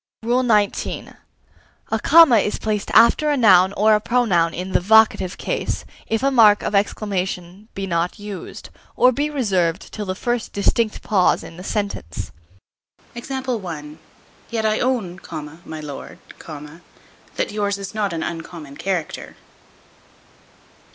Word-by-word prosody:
XIX. 235 Hz, -4 st, 0 dB, 0.8 s
A -, -, +1 dB
comma 325 Hz, -8 st, +7 dB
is 210 Hz, -, -1 dB
placed 210 Hz, -2 st, -2 dB
after 300 Hz, +6 st, +5 dB
a 290 Hz, -, +1 dB
noun 190 Hz, -6 st, +6 dB
or 215 Hz, +2 st, +4 dB
a 210 Hz, -, +3 dB
pronoun 205 Hz, -9 st, +2 dB
in 180 Hz, +3 st, -5 dB
the -, -, +3 dB
vocative 215 Hz, -2 st, +3 dB
case, -, -, -3 dB, 0.2 s
if 225 Hz, +2 st, -1 dB
a 275 Hz, -, +3 dB
mark 215 Hz, -5 st, +5 dB
of -, -, -2 dB
exclamation 195 Hz, -1 st, -2 dB
be 195 Hz, -, -3 dB
not 170 Hz, -1 st, -1 dB
used, 205 Hz, -2 st, -8 dB, 0.2 s
or 250 Hz, -, +5 dB
be 290 Hz, +4 st, -1 dB
reserved 190 Hz, -, -1 dB
till 210 Hz, -2 st, -5 dB
the 185 Hz, -, -2 dB
first 240 Hz, +2 st, -2 dB
distinct 215 Hz, +2 st, 0 dB
pause 190 Hz, -4 st, +2 dB
in 165 Hz, -, -11 dB
the 180 Hz, -, -10 dB
sentence. 200 Hz, -, -4 dB, 0.8 s
Yet 220 Hz, -, -6 dB
I 215 Hz, 0 st, +1 dB
own, 220 Hz, -9 st, -1 dB, 0.5 s
my 155 Hz, -, -7 dB
lord, 145 Hz, -2 st, -8 dB, 1.2 s
that -, -, -2 dB
yours 205 Hz, -1 st, -1 dB
is 195 Hz, +1 st, -7 dB
not 210 Hz, -2 st, -1 dB
an 165 Hz, -1 st, -3 dB
uncommon 165 Hz, -4 st, -7 dB
character. 180 Hz, -5 st, -4 dB
205 Hz, 130 wpm, -21 LUFS, 180-230 Hz, 1.2 s, comma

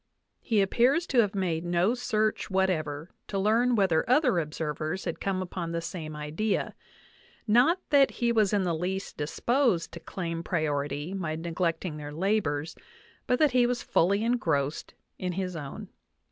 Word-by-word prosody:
He 220 Hz, -4 st, +1 dB
appears 250 Hz, -, +3 dB
to 260 Hz, -, +2 dB
have 210 Hz, -2 st, +2 dB
made 175 Hz, -4 st, -1 dB
no 175 Hz, +5 st, +2 dB
search 220 Hz, -3 st, -1 dB
whatever 165 Hz, -5 st, -1 dB, 0.2 s
to 200 Hz, -, -3 dB
learn 230 Hz, +5 st, +3 dB
whether 185 Hz, -7 st, +3 dB
other 255 Hz, -, +4 dB
observers 155 Hz, +2 st, -3 dB
had 170 Hz, -, -3 dB
come 190 Hz, -1 st, -1 dB
upon 175 Hz, -2 st, -5 dB
the 170 Hz, -, 0 dB
same 165 Hz, -2 st, -6 dB
idea; 150 Hz, +8 st, -2 dB, 0.7 s
not 245 Hz, -, +4 dB
that 280 Hz, -2 st, +6 dB
he 235 Hz, -1 st, 0 dB
was 215 Hz, -4 st, +3 dB
in 205 Hz, -2 st, +2 dB
the 175 Hz, -2 st, 0 dB
least 185 Hz, +4 st, -3 dB
disposed 220 Hz, -, 0 dB
to 170 Hz, -, -8 dB
claim 165 Hz, -1 st, -4 dB
priority 145 Hz, -1 st, -2 dB
by 165 Hz, -5 st, -2 dB
neglecting 165 Hz, 0 st, -2 dB
their 145 Hz, -1 st, -7 dB
labors, 160 Hz, -3 st, -1 dB, 0.5 s
but 250 Hz, -, +3 dB
that 300 Hz, -1 st, +4 dB
he 245 Hz, -1 st, +4 dB
was 245 Hz, 0 st, -2 dB
fully 200 Hz, +5 st, +2 dB
engrossed 160 Hz, -, -1 dB, 0.2 s
in 180 Hz, -1 st, -2 dB
his 180 Hz, -1 st, -3 dB
own. 145 Hz, -4 st, -7 dB
185 Hz, 160 wpm, -28 LUFS, 160-220 Hz, 0.7 s, that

